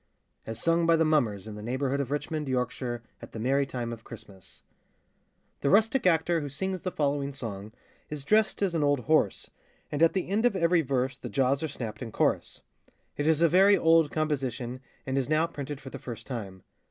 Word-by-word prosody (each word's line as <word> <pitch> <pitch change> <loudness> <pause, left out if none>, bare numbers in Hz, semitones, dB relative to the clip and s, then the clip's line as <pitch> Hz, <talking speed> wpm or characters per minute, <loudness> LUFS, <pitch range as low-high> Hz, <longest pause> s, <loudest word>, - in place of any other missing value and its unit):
As 115 0 -3
sung 165 +4 +2
by 165 - +6
the 160 0 +3
Mummers 115 -11 +1
in 110 - -6
the 105 - -8
Neighbourhood 130 +4 -1
of 135 - -4
Richmond, 150 0 -3
Yorkshire, 125 -1 -2 0.2
at - - -11
the 115 - -6
merrie 135 +4 +1
time 120 -3 -4
of 115 -1 -10
Christmas. 100 -5 -11 1.0
[THE 140 - 0
rustic 220 - +4
actor 165 -1 +2
who 145 - -4
sings 185 +6 -3
the 185 - -2
following 140 -2 0
song 110 -6 -6 0.4
is 150 -2 -6
dressed 215 +1 +2
as 190 -3 +1
an 160 -3 +1
old 145 -2 +2
horse, 155 -7 +1 0.4
and 145 - -2
at 165 - +5
the 190 - -1
end 205 +4 0
of 245 -4 +3
every 170 -1 +3
verse 135 -2 -1
the - - -6
jaws 135 0 +1
are 160 - -1
snapped 120 -6 -6
in 115 -3 -5
chorus. - - 0 0.5
It 145 - -1
is 160 0 +3
a - - +7
very 195 +5 +6
old 165 -2 +4
composition, 135 -5 -2 0.3
and 135 +1 0
is 135 - -2
now 155 +1 +3
printed 145 -3 -6
for 135 - -10
the - - -7
first 115 -2 -8
time. 100 -8 -6
140 Hz, 205 wpm, -28 LUFS, 125-165 Hz, 1.0 s, a